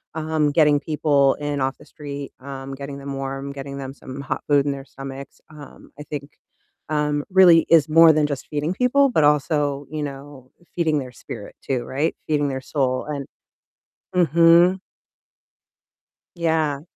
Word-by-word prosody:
um, 155 Hz, -2 st, 0 dB
getting 150 Hz, -2 st, +4 dB
people 145 Hz, -3 st, +2 dB
in 145 Hz, -1 st, -3 dB
off 135 Hz, +1 st, -1 dB
the 150 Hz, -, -17 dB
street, 145 Hz, -1 st, -8 dB
um, 135 Hz, 0 st, -7 dB
getting 140 Hz, 0 st, -7 dB
them 140 Hz, 0 st, -6 dB
warm, 135 Hz, +1 st, -5 dB
getting 140 Hz, 0 st, -7 dB
them 135 Hz, -1 st, -6 dB
some 135 Hz, -1 st, -10 dB
hot 140 Hz, -, -4 dB
food 145 Hz, -1 st, +4 dB
in 140 Hz, -, 0 dB
their 135 Hz, -1 st, -9 dB
stomachs, 135 Hz, 0 st, -9 dB
um, 150 Hz, -2 st, -14 dB
I 150 Hz, -, -8 dB
think 145 Hz, 0 st, -7 dB, 0.6 s
um, 150 Hz, -1 st, 0 dB
really 180 Hz, -3 st, +6 dB
is 160 Hz, -2 st, +5 dB
more 165 Hz, +1 st, +7 dB
than 150 Hz, -1 st, +2 dB
just 140 Hz, -3 st, -5 dB
feeding 150 Hz, +4 st, -2 dB
people, 260 Hz, +5 st, +3 dB
but 160 Hz, -11 st, +2 dB
also, 145 Hz, -1 st, +1 dB
you 155 Hz, -1 st, -4 dB
know, 135 Hz, -2 st, -9 dB, 0.2 s
feeding 160 Hz, -3 st, +1 dB
their 130 Hz, -2 st, -7 dB
spirit 105 Hz, -4 st, -9 dB
too, 130 Hz, -3 st, -2 dB
right? 145 Hz, +5 st, -2 dB
Feeding 145 Hz, -2 st, +1 dB
their 130 Hz, -1 st, -4 dB
soul 130 Hz, -2 st, -1 dB
and 145 Hz, -2 st, -4 dB, 0.9 s
mhm. 170 Hz, +2 st, +5 dB, 1.6 s
Yeah. 160 Hz, -4 st, 0 dB
145 Hz, 160 wpm, -22 LUFS, 140-155 Hz, 1.6 s, more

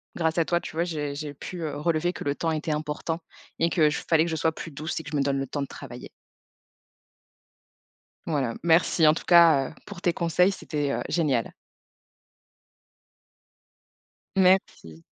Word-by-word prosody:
grâce 160 Hz, 0 st, 0 dB
à 165 Hz, -, +3 dB
toi, 175 Hz, +1 st, +1 dB
tu -, -, -9 dB
vois, 165 Hz, -, +1 dB
j'ai 150 Hz, -5 st, -3 dB
j'ai 145 Hz, 0 st, -5 dB
pu, 170 Hz, +5 st, -8 dB
heu, 150 Hz, -2 st, -3 dB
relever 165 Hz, +3 st, 0 dB
que -, -, -7 dB
le 140 Hz, 0 st, -1 dB
temps 165 Hz, +1 st, -1 dB
était 155 Hz, 0 st, -2 dB
important 155 Hz, +2 st, -3 dB, 0.4 s
et 170 Hz, +1 st, +1 dB
que 155 Hz, -4 st, +4 dB
je 150 Hz, -, -3 dB
fallait 160 Hz, -1 st, +4 dB
que -, -, -3 dB
je -, -, -1 dB
sois 160 Hz, +1 st, +1 dB
plus 165 Hz, -, -8 dB
douce 155 Hz, +3 st, -4 dB
et -, -, -8 dB
que 150 Hz, -, -8 dB
je -, -, -3 dB
me -, -, +2 dB
donne 140 Hz, 0 st, 0 dB
le 135 Hz, -, -3 dB
temps 145 Hz, +2 st, -4 dB
de -, -, -5 dB
travailler. 120 Hz, -1 st, -10 dB, 2.2 s
Voilà. 140 Hz, -7 st, -1 dB
Merci 165 Hz, -1 st, +4 dB
en 155 Hz, -, +7 dB
tout -, -, -6 dB
cas, 165 Hz, -6 st, +6 dB
heu, -, -, -14 dB
pour 195 Hz, -4 st, -10 dB
tes 175 Hz, -, +1 dB
conseils, 170 Hz, +3 st, +2 dB
c'était, 145 Hz, -6 st, -3 dB
heu, -, -, -2 dB
génial. 140 Hz, -9 st, 0 dB, 2.8 s
Merci. 185 Hz, -, +1 dB
160 Hz, 180 wpm, -26 LUFS, 145-170 Hz, 2.8 s, en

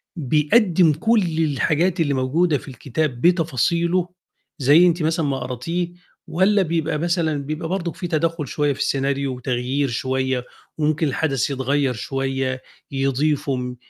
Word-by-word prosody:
بيقدّم 160 Hz, -, +3 dB
كل 220 Hz, +8 st, +2 dB, 0.2 s
الحاجات 160 Hz, +5 st, +1 dB
اللي 145 Hz, -3 st, +2 dB
موجودة 145 Hz, +5 st, +1 dB
في -, -, -13 dB
الكتاب 130 Hz, +1 st, -3 dB
بتفاصيله 170 Hz, +2 st, +2 dB, 0.5 s
زي 150 Hz, +7 st, +6 dB
أنتِ 170 Hz, -1 st, +1 dB
مثلًا 160 Hz, 0 st, +1 dB
ما 135 Hz, -2 st, -1 dB
قراتيه 165 Hz, +8 st, -3 dB, 0.4 s
والّا 190 Hz, +5 st, +3 dB
بيبقى 165 Hz, -2 st, -1 dB
مثلًا 165 Hz, -2 st, 0 dB
بيبقى 155 Hz, +2 st, -4 dB
برضُك 180 Hz, -2 st, -2 dB
في 175 Hz, -, -4 dB
تدخُّل 165 Hz, -2 st, -1 dB
شوية 145 Hz, +2 st, 0 dB
في 135 Hz, -, -12 dB
السيناريو 135 Hz, -1 st, 0 dB
وتغيير 125 Hz, +3 st, -1 dB
شوية، 130 Hz, +1 st, -1 dB, 0.3 s
وممكن 155 Hz, +1 st, +1 dB
الحدث 135 Hz, -2 st, 0 dB
يتغيّر 135 Hz, 0 st, 0 dB
شوية، 135 Hz, +2 st, -2 dB, 0.3 s
يضيفوا، 135 Hz, -2 st, -1 dB
150 Hz, 130 wpm, -21 LUFS, 135-170 Hz, 0.5 s, زي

